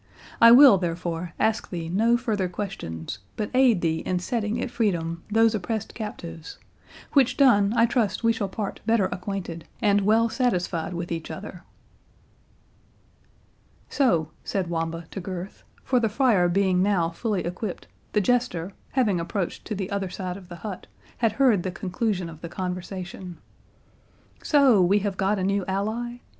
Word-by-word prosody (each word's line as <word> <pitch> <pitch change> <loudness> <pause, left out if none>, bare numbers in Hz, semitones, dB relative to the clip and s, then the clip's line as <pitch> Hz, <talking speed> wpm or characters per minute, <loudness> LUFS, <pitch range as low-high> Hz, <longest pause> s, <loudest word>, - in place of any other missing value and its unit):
I 230 - +10
will, 250 -5 +9
therefore, 170 -1 -3
ask 220 +1 +1
thee 170 -3 -4
no 225 +7 +3
further 215 -7 -1
questions, 170 - -5 0.2
but 210 - -3
aid 250 -7 +4
thee 160 -1 0
in 180 +2 -2
setting 215 +4 -2
at - - -3
freedom 170 -7 -1
these 225 +1 +4
oppressed 215 +2 -3
captives; 180 -7 -7 0.6
which 270 -4 +4
done, 205 -8 +5
I 230 - +6
trust 230 -4 0
we 230 0 +4
shall 210 -3 -3
part 205 +1 -4
better 225 -3 +3
acquainted, 180 -3 -5
and 205 -3 +3
well 220 +3 +3
satisfied 180 -9 -1
with 170 0 -5
each 165 -1 -4
other." 190 -2 -8 2.2
"So," 170 - +1
said 185 -4 -2
Wamba 165 0 -3
to 195 - -5
Gurth,—for 190 +7 -4
the 225 -2 +1
friar 210 -6 +3
being 185 0 +2
now 185 -4 +2
fully 205 +2 -2
equipped, 180 +3 -5 0.3
the 210 - +3
Jester, 200 -5 0 0.2
having 215 -9 +2
approached 175 +2 -3
to 215 - -3
the 195 +1 -4
other 200 -2 -2
side 180 -1 -5
of 185 -2 -12
the 175 - -7
hut, 195 +1 -7 0.3
had 225 -3 +2
heard 235 -6 +3
the 185 - -3
conclusion 185 0 -2
of 160 -1 -11
the 170 - -6
conversation,—"So 185 - -2
we 185 +3 +4
have 200 -1 -2
got 195 +2 +1
a 190 - -2
new 195 +1 +1
ally? 220 +5 -2
195 Hz, 155 wpm, -25 LUFS, 175-225 Hz, 2.2 s, I